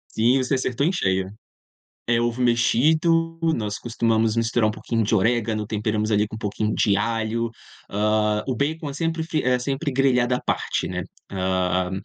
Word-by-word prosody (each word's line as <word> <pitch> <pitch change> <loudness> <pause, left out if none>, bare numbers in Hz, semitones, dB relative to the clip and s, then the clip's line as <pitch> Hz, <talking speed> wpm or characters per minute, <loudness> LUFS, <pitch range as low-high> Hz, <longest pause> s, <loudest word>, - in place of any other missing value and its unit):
Sim, 120 +4 +4
você 130 - -1
acertou 130 +2 0
em 180 - +2
cheio. 95 - 0 0.8
É 120 0 +2
ovo 120 +1 -1
mexido. 160 +8 +2
Nós 115 -11 0
costumamos 115 -1 0
misturar 115 -1 +2
um - - -1
pouquinho 115 +1 -2
de 105 - -1
orégano, 110 0 +1
temperamos 110 0 -1
ali 105 0 +3
com - - -7
um - - -6
pouquinho 105 0 -2
de 100 - +2
alho, 115 +2 -1 0.4
hã, 105 +1 +1
o 130 - -1
bacon 150 +4 -2
é - - -6
sempre 165 +2 -2
f 160 -2 -2
é 125 0 +2
sempre 140 +4 -2
grelhado 125 -2 +2
à 125 - 0
parte, - - -1
né, - - -3 0.3
hã, 95 -1 0
115 Hz, 175 wpm, -23 LUFS, 105-135 Hz, 0.8 s, Sim